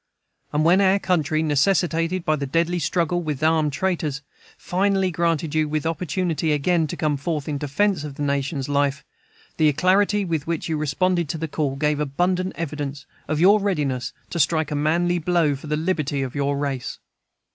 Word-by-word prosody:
And 150 +1 +1
when 180 +4 +5
our 195 0 +4
country, 160 -5 0
necessitated 165 +3 +1
by 155 - +2
the 140 -2 -4
deadly 170 +5 +1
struggle 175 +2 0
with 155 -3 -4
armed 155 -2 +3
traitors, 150 -2 -2 0.3
finally 190 0 +1
granted 165 -2 0
you 155 -1 +1
the 155 +1 -1
opportunity 165 -1 -1
again 160 +2 +1
to - - -6
come 150 -2 0
forth 150 0 -3
in 145 -2 -2
defence 155 +4 0
of 145 -2 -7
the 145 - -4
nation's 140 0 -1
life, 140 -1 0 0.5
the 155 -1 +4
alacrity 195 +6 +2
with 160 -4 -2
which 165 -2 -2
you 160 - -1
responded 170 +3 0
to 160 - -2
the 160 +1 -3
call 145 -3 -2
gave 150 +1 0
abundant 180 +6 0
evidence 145 -3 -5 0.2
of 150 +1 -1
your 200 +5 +6
readiness 145 -11 -1 0.2
to 170 - -3
strike 155 0 +1
a - - -1
manly 170 +4 +1
blow 165 -3 +2
for 140 +3 -10
the 150 0 0
liberty 155 -5 -1
of 130 - -5
your 140 0 0
race. 140 -3 -3
155 Hz, 180 wpm, -23 LUFS, 145-175 Hz, 0.5 s, your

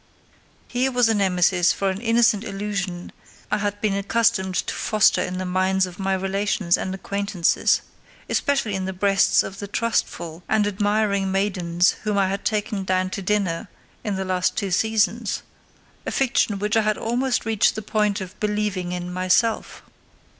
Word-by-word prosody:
Here 255 +2 0
was 245 -2 +3
a - - +3
nemesis 185 -2 +3
for 195 0 0
an 190 +2 -6
innocent 230 -3 +3
illusion 195 -4 -4 0.4
I 210 - +1
had 205 0 -2
been 215 -2 +1
accustomed 200 -2 +1
to - - -1
foster 215 -2 +3
in 185 0 -3
the 185 - -3
minds 185 +1 +1
of 180 0 -11
my 195 0 0
relations 195 -1 0
and 190 0 -3
acquaintances, 200 -2 +1 0.5
especially 275 -7 0
in 190 -1 -2
the 190 - -3
breasts 195 0 +3
of 195 +1 -8
the 205 - -5
trustful 185 -6 -2
and 215 -1 +3
admiring 205 -1 0
maidens 180 -3 +1
whom 210 -1 -1
I 195 -1 +2
had 195 +1 -4
taken 210 -2 -1
down 185 0 0
to 195 - -4
dinner 190 -4 -1 0.4
in 205 -2 -2
the 190 0 -3
last 185 -1 0
two 200 -2 -1
seasons; 220 +2 +1 0.6
a - - -3
fiction 240 -5 +1
which 210 +2 -1
I 225 - +5
had 215 -1 0
almost 245 +3 -1
reached 220 -2 +2
the 215 - -5
point 210 -1 0
of 190 +1 -9
believing 210 -4 -1
in 180 0 -5
myself. 185 +5 0
200 Hz, 170 wpm, -23 LUFS, 185-215 Hz, 0.6 s, I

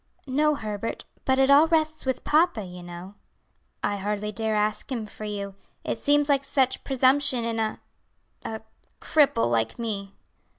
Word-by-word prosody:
"No, 300 +3 +2
Herbert; 215 -3 -4 0.2
but 265 0 +3
it 270 +1 +4
all 295 +3 +7
rests 315 -3 0
with 260 - -1
papa, 305 - +3
you 180 0 -9
know." 175 +2 -9 0.7
"I 205 - 0
hardly 210 +1 -2
dare 220 +1 -1
ask 210 +4 -1
him 235 -4 -2
for 215 +1 -9
you, 200 -1 -4 0.3
it - - -3
seems 290 0 +3
like 280 -2 +2
such 265 -2 +1
presumption 265 -1 +2
in 230 -1 -2
a 220 -1 -1 0.6
a 220 0 -5 0.4
cripple 270 - +3
like 115 -1 0
me." 200 -4 -4
225 Hz, 160 wpm, -26 LUFS, 205-280 Hz, 0.7 s, all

